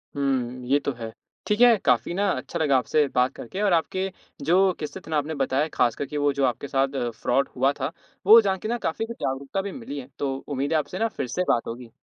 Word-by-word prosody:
हुँ, 130 -3 -1
ये 140 +3 +4
तो - - +1
है। 115 -2 -7 0.4
ठीक 210 +2 +1
है, 240 -2 +7
काफ़ी 125 - +1
ना 200 +3 +1
अच्छा 170 - -4
लगा 145 -4 +3
आपसे 145 +4 +2
बात 125 +2 +3
करके। 185 - -6
और 205 -3 +3
आपके 185 +3 0 0.3
जो 185 +4 +4
किस्से 150 -2 -5
थे 160 - -10
ना 155 - +2
आपने 150 +2 -2
बताया 135 +2 +1
ख़ासकर 120 +3 +1
कि 150 - -5
वो 145 0 +2
जो 140 -1 +1
आपके 125 +2 -2
साथ 135 -2 0
फ्रॉड 135 +3 +1
हुआ 135 +2 +3
था, 135 +3 -2 0.3
वो 220 +4 +10
जान 195 -3 0
के 215 - -5
ना 240 +2 0
काफ़ी 220 +8 -2
कुछ 235 +1 -7
जागरूकता 135 +8 -2
भी 200 0 -5
मिली 210 - -6
है। 125 - -9
तो 135 -2 -1
उम्मीद 140 +2 -1
है - - +4
आपसे 180 +6 -5
ना 225 - +2
फ़िर 175 - -4
से 180 - -1
बात 115 - +2
होगी। 120 0 -7
145 Hz, 245 wpm, -25 LUFS, 130-185 Hz, 0.4 s, वो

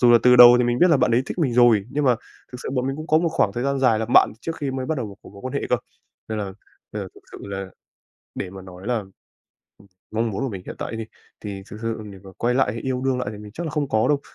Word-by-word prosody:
dù 120 -1 +6
là 120 - +8
từ 125 0 +6
đầu 120 0 +11
thì 125 - +3
mình 120 0 +1
biết 180 -1 +5
là 155 - +6
bạn - - +2
ấy 120 +3 +3
thích - - -6
mình 140 -7 +1
rồi, 120 -5 +5
nhưng 145 0 -1
mà 125 -3 +4 0.4
thực 125 - -7
sự - - -4
bọn 125 0 0
mình 135 +1 -2
cũng 155 +1 -7
có 155 - +4
một 170 0 +1
khoảng 100 -10 +1
thời 120 +4 -3
gian 140 0 0
dài 120 -5 +3
làm 110 +2 -3
bạn - - +6
trước 165 +3 -4
khi 140 -3 -3
mới 130 -1 -3
bắt 160 - 0
đầu 115 - -3
vào - - -9
một 100 - -14
cái - - -13
mối 100 - -12
quan 130 - -5
hệ - - -1
cơ. - - +3 0.5
Nên 110 -1 -3
là 100 -2 -4 0.4
nên - - -3
là - - -7
thực - - -16
sự - - -8
là, 100 -1 -5 0.7
để 90 - -4
mà 95 0 -10
nói 95 +2 -11
làm 120 -3 0
ừm, 95 - -20 1.0
mong 115 +1 0
muốn 105 +7 -3
của 135 - 0
mình 95 -4 -6
hiện - - -7
tại - - -4
á - - -4
thì, 110 - -3 0.4
thì 100 -2 -6
thực 105 - -8
sự 115 -1 -2
để 95 - -11
mà 95 - -11
quay 120 +1 +1
lại 125 -5 +2
hay 115 - -5
yêu 130 -1 -2
đương 130 -1 +1
lại 125 - -2
thì 105 - -9
mình 105 0 -11
chắc 170 +6 -5
là - - -3
không 150 -3 -1
có 110 +2 +2
đâu 145 -1 +2
120 Hz, 325 wpm, -23 LUFS, 105-135 Hz, 1.0 s, đầu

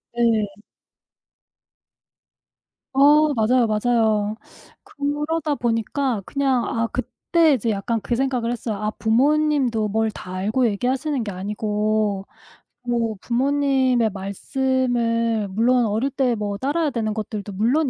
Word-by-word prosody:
네. 220 -4 +1 2.3
어 295 +2 +5
맞아요, 235 +2 +3
맞아요. 215 -1 +1 0.5
그러다 295 +2 -2
보니까 235 0 -1
그냥 270 -3 0
아 230 0 -1
그때 305 +6 +1
이제 235 -3 0
약간 220 +2 -1
그 240 - -1
생각을 250 -2 0
했어요. 230 -2 -3
아 210 +1 -2
부모님도 255 -1 +1
뭘 220 +2 +1
다 185 -2 -9
알고 215 +7 0
얘기하시는 255 +5 -1
게 205 - -4
아니고 210 +1 -1 0.6
뭐 235 -3 -1
부모님의 260 -2 +2
말씀을 230 +1 -1
물론 235 +4 +2
어릴 220 +6 0
때 260 -3 0
뭐 205 -2 -3
따라야 295 +6 0
되는 225 -5 -2
것들도 210 -1 -5
물론 255 +9 +1
235 Hz, 240 characters per minute, -22 LUFS, 215-265 Hz, 2.3 s, 어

